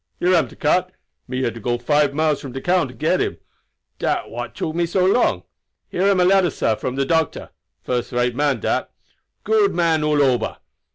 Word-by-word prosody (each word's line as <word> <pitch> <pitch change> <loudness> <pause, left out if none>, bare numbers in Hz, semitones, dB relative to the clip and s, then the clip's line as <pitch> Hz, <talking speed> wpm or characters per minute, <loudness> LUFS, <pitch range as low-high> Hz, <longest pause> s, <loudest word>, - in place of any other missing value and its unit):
"Here 180 +1 +2
am 170 -3 +3
de - - -15
cart. 180 +4 +1 0.4
Me 130 +1 -3
had 120 -3 -1
to 115 - -9
go 120 +2 -1
to 120 - -20
five 145 +1 +3
miles 155 -1 +1
from 135 -3 -8
de 135 - -4
town 175 0 +1
to 125 - -12
get - - +1
him. - - -2 0.6
Dat - - -1
what 120 +1 -6
took 155 - -3
me 170 +1 0
so 180 +2 +1
long. 195 +6 +2 0.5
Here 185 +3 0
am 195 -2 +3
a 180 - +4
letter, 190 -1 +4
sah, 115 - 0
from 125 +4 -4
the 135 0 0
doctor. 160 +1 -1 0.3
First 125 -1 -2
rate 120 0 0
man 145 0 0
dat. - - -1 0.5
Good 430 -2 +2
man 165 -3 +2
all 150 -1 +3
ober." 130 -3 0
150 Hz, 215 wpm, -21 LUFS, 125-175 Hz, 0.6 s, a